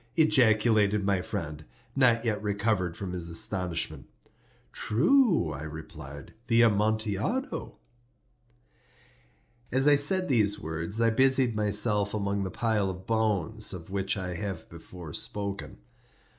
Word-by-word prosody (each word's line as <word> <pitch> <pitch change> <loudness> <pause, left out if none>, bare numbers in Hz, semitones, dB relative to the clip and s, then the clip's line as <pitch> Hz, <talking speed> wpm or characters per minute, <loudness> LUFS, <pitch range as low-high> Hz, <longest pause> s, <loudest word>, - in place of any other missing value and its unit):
ejaculated 110 -9 +3
my 100 -2 +1
friend, 80 -7 -5 0.3
not 120 -3 +3
yet 105 -3 -1
recovered 100 -4 -1
from 95 -3 -5
his 85 -2 -2
astonishment. 90 0 -1 0.6
"True," 170 - +2
I 70 - -7
replied; 75 -2 -9
"the 115 0 +4
Amontillado." 110 - -1 1.9
As 135 +3 +4
I 145 - +7
said 185 +6 +3
these 105 -6 +2
words 80 +7 -3
I 115 0 +3
busied 130 0 +3
myself 105 0 +2
among 100 -1 -1
the 95 - -3
pile 105 -2 0
of 95 0 -8
bones 110 -1 0
of 85 0 -11
which 100 0 -1
I 90 -2 -4
have 95 -2 -5
before 85 -1 -10
spoken. 100 -1 -5
105 Hz, 120 wpm, -28 LUFS, 90-115 Hz, 1.9 s, I